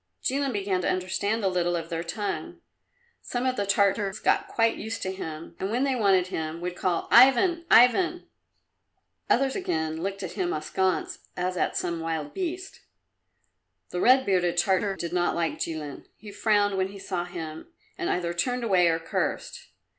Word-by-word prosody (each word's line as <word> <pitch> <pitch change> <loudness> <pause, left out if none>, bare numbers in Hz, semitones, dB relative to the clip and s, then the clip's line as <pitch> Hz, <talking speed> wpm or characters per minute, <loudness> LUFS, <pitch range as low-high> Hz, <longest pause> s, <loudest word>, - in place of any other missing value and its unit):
Jilin 275 0 0
began 195 -4 -1
to - - 0
understand 200 +4 -1
a - - +3
little 175 -1 0
of 165 -1 -4
their 165 -1 -2
tongue. 205 +5 -4 0.6
Some 245 +1 -3
of 255 0 +1
the 205 -4 -2
Tartars 200 0 +2
got - - +1
quite 225 -1 +1
used 220 +2 -5
to 190 - -2
him, 165 -4 -7
and 190 - -2
when 245 +5 0
they 270 -2 +1
wanted 195 -6 +3
him 160 -1 -4
would 180 +1 -4
call 180 -2 -1
"Ivan, 335 +8 +6
Ivan!" 345 +9 +5 1.0
Others 265 +1 +2
again 160 - -2
looked 195 +1 -3
at 180 - -4
him 180 -4 -2
askance 185 +5 -1 0.2
as 180 +1 -1
at - - 0
some 170 -1 -2
wild 160 -2 -3
beast. 370 +1 -4 1.1
The 180 - -2
red 260 +1 +5
bearded 180 -3 +1
Tartar 190 +2 +2
did 170 -2 -5
not 175 -1 +1
like 170 -1 -1
Jilin. 155 -4 -5
He 210 -1 -11
frowned 205 -1 +2
when 190 0 +1
he 200 +1 -10
saw 185 -2 -3
him, 165 - -7 0.3
and 365 -2 -3
either 175 -1 -1
turned 245 +8 -1
away 185 -6 +4
or 165 -1 +2
cursed. 165 0 -3
190 Hz, 175 wpm, -26 LUFS, 175-225 Hz, 1.1 s, Ivan